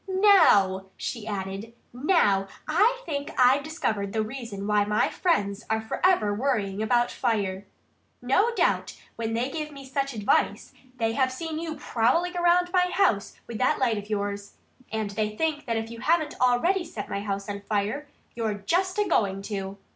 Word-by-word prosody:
Now 325 Hz, -, +5 dB
" -, -, -39 dB
she 225 Hz, -3 st, -5 dB
added 200 Hz, +2 st, -5 dB, 0.2 s
"now 245 Hz, -, +2 dB, 0.2 s
I 425 Hz, +11 st, +3 dB
think 285 Hz, -3 st, -3 dB
I've 260 Hz, +2 st, +5 dB
discovered 220 Hz, -, -2 dB
the 220 Hz, -1 st, +1 dB
reason 220 Hz, -4 st, -6 dB
why 210 Hz, 0 st, +3 dB
my 210 Hz, +1 st, +1 dB
friends 210 Hz, -, 0 dB
are 220 Hz, 0 st, +1 dB
forever 220 Hz, -, +1 dB
worrying 210 Hz, -4 st, -1 dB
about 240 Hz, +2 st, +2 dB
fire. 200 Hz, -5 st, -1 dB, 0.5 s
No 380 Hz, -, +2 dB
doubt -, -, 0 dB, 0.2 s
when 225 Hz, 0 st, -3 dB
they 250 Hz, +4 st, -1 dB
give 305 Hz, 0 st, -4 dB
me 275 Hz, -2 st, -10 dB
such 275 Hz, 0 st, -2 dB
advice 210 Hz, -2 st, 0 dB, 0.2 s
they 225 Hz, -2 st, +1 dB
have 260 Hz, 0 st, +1 dB
seen 315 Hz, +4 st, -4 dB
you 325 Hz, -1 st, -4 dB
prowling 295 Hz, +7 st, +1 dB
around 355 Hz, +1 st, +3 dB
my 360 Hz, -1 st, +3 dB
house 220 Hz, -, +1 dB
with 230 Hz, -2 st, -7 dB
that 255 Hz, -, +2 dB
light 235 Hz, -5 st, +1 dB
of 205 Hz, +1 st, -11 dB
yours; 205 Hz, -1 st, -3 dB, 0.4 s
and 215 Hz, -2 st, -2 dB
they 215 Hz, 0 st, -2 dB
think 310 Hz, -3 st, -1 dB
that 230 Hz, -1 st, 0 dB
if 225 Hz, 0 st, -4 dB
you 230 Hz, -, -8 dB
haven't 315 Hz, +2 st, +1 dB
already 295 Hz, +10 st, +3 dB
set 225 Hz, -11 st, -7 dB
my 200 Hz, -, -3 dB
house 200 Hz, -1 st, -3 dB
on 200 Hz, -1 st, -5 dB
fire, 210 Hz, +8 st, -2 dB, 0.3 s
you're 225 Hz, -3 st, -1 dB
just 360 Hz, -, 0 dB
a 415 Hz, -1 st, +2 dB
going 195 Hz, -, +1 dB
to." 195 Hz, -1 st, -5 dB
230 Hz, 175 wpm, -26 LUFS, 205-310 Hz, 0.5 s, Now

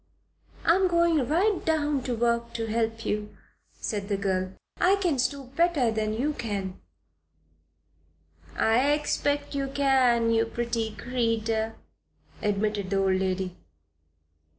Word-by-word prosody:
"I 335 Hz, -, +6 dB
am 380 Hz, +1 st, +3 dB
going 340 Hz, -6 st, +2 dB
right 370 Hz, +6 st, +2 dB
to 290 Hz, -6 st, 0 dB
work 235 Hz, 0 st, 0 dB
to 225 Hz, -, -2 dB
help 225 Hz, 0 st, -1 dB
you," 210 Hz, 0 st, -3 dB, 0.4 s
said 205 Hz, -2 st, -3 dB
the 200 Hz, -, +1 dB
girl. 190 Hz, -1 st, -1 dB, 0.3 s
"I 375 Hz, +3 st, +5 dB
can 350 Hz, -9 st, 0 dB
stoop 260 Hz, +1 st, -2 dB
better 330 Hz, -8 st, +3 dB
than 215 Hz, -1 st, -1 dB
you 285 Hz, +7 st, 0 dB
can." 200 Hz, -7 st, -4 dB, 1.7 s
"I 250 Hz, +6 st, +3 dB
expect 290 Hz, -1 st, -1 dB
you 275 Hz, -1 st, -1 dB
can, 260 Hz, -4 st, +3 dB
you 225 Hz, 0 st, +2 dB
pretty 230 Hz, -2 st, -2 dB
creeter," 225 Hz, -2 st, -1 dB, 0.7 s
admitted 205 Hz, -1 st, 0 dB
the 195 Hz, -, +1 dB
old 190 Hz, -1 st, +2 dB
lady. 185 Hz, -1 st, -2 dB
235 Hz, 125 wpm, -27 LUFS, 215-285 Hz, 1.7 s, I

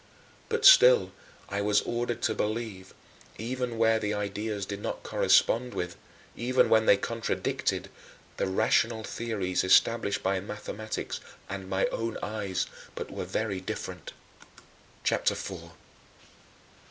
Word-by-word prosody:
But 460 Hz, 0 st, 0 dB
still -, -, +8 dB, 0.4 s
I 100 Hz, 0 st, -2 dB
was 105 Hz, 0 st, +3 dB
ordered 120 Hz, 0 st, -3 dB
to 110 Hz, -, +2 dB
believe, 105 Hz, -4 st, -3 dB, 0.5 s
even 120 Hz, +1 st, -3 dB
where 115 Hz, 0 st, +3 dB
the 105 Hz, -1 st, -1 dB
ideas 105 Hz, 0 st, -3 dB
did 100 Hz, +1 st, -6 dB
not -, -, -4 dB
correspond 125 Hz, +2 st, +2 dB
with 90 Hz, 0 st, -3 dB, 0.4 s
even 125 Hz, +2 st, +2 dB
when 110 Hz, 0 st, +4 dB
they 100 Hz, -, +7 dB
contradicted 115 Hz, +2 st, -2 dB, 0.5 s
the -, -, 0 dB
rational 110 Hz, +3 st, +2 dB
theories 105 Hz, -6 st, -2 dB
established 100 Hz, +2 st, +3 dB
by 95 Hz, 0 st, +1 dB
mathematics 105 Hz, +2 st, -5 dB, 0.3 s
and 95 Hz, -1 st, -6 dB
my 95 Hz, 0 st, +1 dB
own 115 Hz, 0 st, -3 dB
eyes, 105 Hz, -3 st, -2 dB, 0.3 s
but -, -, -6 dB
were -, -, -4 dB
very 100 Hz, -4 st, -2 dB
different. -, -, -6 dB, 0.9 s
CHAPTER -, -, +2 dB
IV -, -, -6 dB
7. -, -, -7 dB
110 Hz, 130 wpm, -28 LUFS, 100-115 Hz, 0.9 s, still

